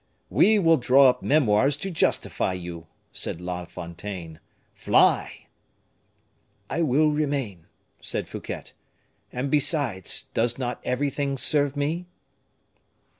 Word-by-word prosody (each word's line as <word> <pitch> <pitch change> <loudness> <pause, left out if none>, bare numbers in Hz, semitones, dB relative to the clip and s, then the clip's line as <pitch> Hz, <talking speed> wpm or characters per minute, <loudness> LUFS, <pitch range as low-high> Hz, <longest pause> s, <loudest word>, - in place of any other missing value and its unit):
"We 220 +1 +5
will 165 -4 +4
draw 130 +1 +6
up 125 - -1
memoirs 135 -1 +3
to 195 +5 -4
justify 155 - 0
you," 85 -2 -7 0.2
said - - -3
La 90 0 -5
Fontaine. 85 -1 -8 0.3
"Fly!" - - +2 1.3
"I 170 - 0
will 155 +1 +3
remain," 140 - -2 0.3
said - - -3
Fouquet. - - -7 0.6
"And, 130 +2 -3
besides, 145 - 0
does 115 +1 +1
not 125 -2 -4
everything 140 +1 -1
serve 145 +1 +1
me?" 160 +5 -2
135 Hz, 110 wpm, -25 LUFS, 95-150 Hz, 1.3 s, draw